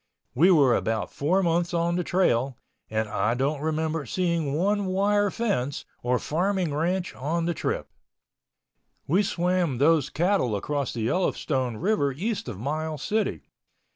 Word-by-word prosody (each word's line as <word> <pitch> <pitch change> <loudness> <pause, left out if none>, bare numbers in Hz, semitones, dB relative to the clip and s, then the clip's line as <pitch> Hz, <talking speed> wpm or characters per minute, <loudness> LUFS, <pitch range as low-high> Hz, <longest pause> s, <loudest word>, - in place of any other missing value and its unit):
We 165 +9 +5
were 145 -9 +5
about 110 0 -1
four 180 +7 +1
months 170 +1 +1
on 170 +1 +1
the 180 - 0
trail 135 -9 +1 0.3
and 110 0 -1
I 110 +2 0
don't 140 +3 -1
remember 160 +1 -1
of 130 - -10
seeing 170 - 0
one 200 +5 +1
wire 205 +2 +2
fence 185 - -2 0.2
or 125 +1 +1
farming 180 +3 -1
ranch 175 +4 -1
on 165 +5 -2
the 170 - 0
trip. - - -2 1.2
We 180 +8 +3
swam 180 -6 0
those 150 +1 +3
cattle 170 - +1
across 140 +6 -2
the 115 - -4
Yellowstone 130 -3 0
River 170 - +1
east 195 - -3
of - - -5
Miles 155 +5 -3
City. 215 0 -1
160 Hz, 150 wpm, -26 LUFS, 135-185 Hz, 1.2 s, We